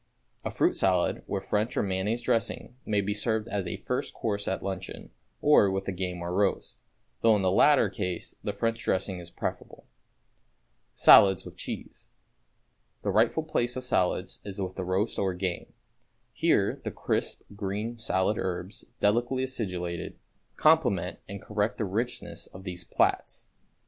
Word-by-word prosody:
A - - -2
fruit - - +2
salad, - - +2
with 95 -1 -3
French 105 +5 0
or - - +2
mayonnaise 100 +5 -1
dressing, 115 +1 -1
may 105 -1 +2
be 100 +1 -1
served 110 +1 0
as 100 -4 -2
a 85 - -3
first - - -3
course 100 -2 -2
at 95 - -2
luncheon, 95 -1 -6 0.3
or 145 -9 +6
with 95 0 -2
the - - -2
game 90 -1 -4
or 85 +1 -3
roast, 100 +1 0 0.4
though 115 -1 +6
in 100 - 0
the 95 - +3
latter 145 +9 +5
case 90 -5 -4
the 105 - -1
French 115 +3 -1
dressing 95 0 0
is 85 -1 -8
preferable. - - -6 1.1
=Salads 95 -2 +7
with - - -10
Cheese.= - - -7 0.9
The - - 0
rightful 160 - +3
place 125 -6 0
of 130 - -4
salads 95 -5 0
is 100 0 -7
with 95 -1 -3
the 95 - -3
roast 95 +5 0
or 95 -2 0
game. 90 -1 -3 0.6
Here - - +2
the - - -2
crisp, - - -2
green 105 +4 -3
salad 105 -1 +1
herbs, 95 +1 -4 0.2
delicately 120 +5 +2
acidulated, 90 -9 -4 0.4
complement 155 - +3
and 100 0 -6
correct 105 +2 -1
the 110 - -1
richness 115 +6 -3
of 95 - -12
these 90 -2 -5
plats. - - 0
100 Hz, 160 wpm, -28 LUFS, 95-115 Hz, 1.1 s, =Salads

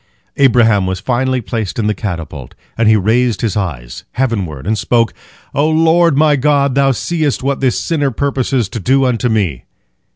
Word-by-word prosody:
Abraham 115 -7 +3
was 95 0 -3
finally 130 +1 -1
placed 110 -3 -4
in 115 - -1
the 105 - +1
catapult, 80 - -6 0.2
and 115 -1 +2
he 110 - +5
raised 110 +2 +1
his 110 -6 -1
eyes 65 -12 -4
heavenward, 100 - -2
and 110 +3 0
spoke, 115 +2 +1 0.4
"O 145 +3 +1
Lord 165 -1 +3
my 150 0 +4
God, 140 0 +1
Thou 135 0 +3
seest 150 +2 -1
what 140 0 -1
this 130 -3 0
sinner 145 -5 -1
purposes 130 -2 -1
to 115 - -5
do 135 +7 +2
unto 125 -1 0
me!" 95 - -1
120 Hz, 170 wpm, -15 LUFS, 105-140 Hz, 0.4 s, he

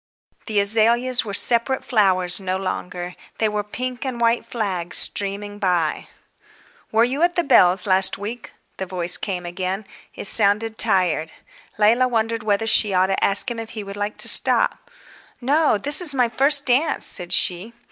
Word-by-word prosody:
The 215 -2 0
azaleas 230 +5 +1
were 205 -3 -8
separate 240 +4 +2
flowers 185 -6 +1
no 190 -1 -3
longer; 180 -1 -6 0.2
they 220 - 0
were 210 -1 -3
pink 250 +4 -6
and 255 -3 -5
white 235 0 0
flags 190 -7 -4
streaming 205 +1 -2
by. 180 -5 -2 0.8
"Were 225 +1 +2
you 260 +5 -2
at 350 +1 +1
the 345 - 0
Bells' 185 - +3
last 190 -1 +3
week?" 220 +4 -8 0.3
the 190 - -5
voice 180 -2 -2
came 180 -2 -5
again. 185 +3 -5 0.3
It - - -7
sounded 215 +2 0
tired. 165 -4 +1 0.5
Leila 230 +4 +2
wondered 230 -1 -2
whether 215 0 -1
she 210 -3 +1
ought 190 +1 +1
to - - -1
ask 200 +5 +2
him 235 - -6
if 225 -1 -8
he 210 - -5
would 200 0 -9
like 205 +1 -5
to - - 0
stop. - - +3 0.5
"No, 285 0 +1
this 290 - +4
is 305 -6 +4
my 250 -2 +1
first 280 +5 +3
dance," 275 +5 +2
said 175 -2 +1
she. 180 +4 0
210 Hz, 170 wpm, -20 LUFS, 190-240 Hz, 0.8 s, this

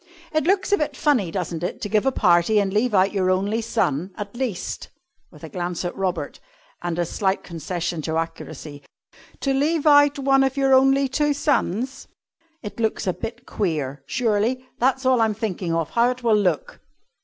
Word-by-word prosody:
It 310 -2 +1
looks 380 +2 +1
a 405 - +4
bit 300 - -2
funny, 250 - +2
doesn't 170 -2 -3
it, 175 - -3
to - - -2
give 215 +4 +1
a - - +4
party 175 0 +3
and 195 -1 0
leave 215 +1 +1
out 190 +2 +3
your 185 -2 +1
only 200 +5 +1
son, 185 -8 -1
at 205 -1 -6
least," 240 -8 -4 0.4
with - - -17
a - - -7
glance 175 -3 -3
at 175 - -3
Robert, 190 -2 -3 0.4
and 175 -1 -3
a 175 - +1
slight 190 +3 -1
concession 170 0 -4
to 160 +1 -2
accuracy 155 -2 -6 0.6
"to 275 - +1
leave 300 +3 +1
out 290 -1 +6
one 270 0 +3
of 270 0 -1
your 270 -1 +3
only 270 +1 +5
two 295 +2 +1
sons? 270 - -1 0.6
It 210 +2 -7
looks 220 -1 0
a 185 - +1
bit 225 +5 -7
queer, 145 -8 -2
surely. 235 +2 0
That's 265 +2 +1
all 255 -2 +4
I'm 220 -2 +2
thinking 190 -5 -3
of 165 -1 -1
how 235 +1 +3
it 250 0 -5
will 225 -2 +4
look." 185 -7 -1
215 Hz, 190 wpm, -23 LUFS, 180-265 Hz, 0.6 s, out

